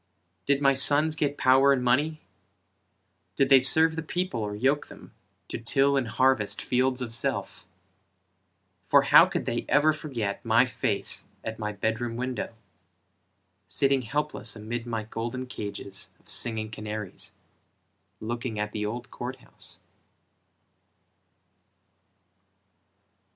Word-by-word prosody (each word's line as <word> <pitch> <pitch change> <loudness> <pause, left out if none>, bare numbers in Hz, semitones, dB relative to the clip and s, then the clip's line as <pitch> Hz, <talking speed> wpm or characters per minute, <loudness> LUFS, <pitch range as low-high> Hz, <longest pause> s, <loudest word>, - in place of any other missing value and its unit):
Did 140 0 +2
my 135 0 +5
sons 145 +3 +4
get 145 -2 -1
power 135 +2 +5
and 130 -2 +1
money? 150 +6 +1 1.1
Did 135 -1 +2
they 135 -1 +8
serve 160 +5 +4
the 160 - -3
people 175 -4 -3
or 105 -1 -3
yoke 135 +7 +1
them, - - -14 0.4
To - - -4
till 135 +4 +2
and 135 -4 0
harvest 115 -2 +2
fields 130 0 0
of 115 -2 -6
self? 105 -6 -3 1.2
For - - +5
how - - +7
could - - -3
they - - -2
ever 150 +2 +4
forget 120 -10 -4
My 115 +2 +4
face 130 - -3 0.2
at 110 0 -6
my 105 -1 -2
bed 110 +2 -2
room 120 -1 -3
window, 125 -2 -4 1.1
Sitting 135 -1 +3
helpless 145 +5 -1
amid 115 +2 -5
my 115 -2 -3
golden 115 +4 -5
cages 100 -5 -7
Of - - -29
singing 110 -2 -3
canaries, 105 -2 -6 0.9
Looking 115 0 -4
at 105 0 -2
the 105 - -3
old 120 +3 -6
court 125 +2 -5
house? - - -8
125 Hz, 130 wpm, -27 LUFS, 110-140 Hz, 1.2 s, they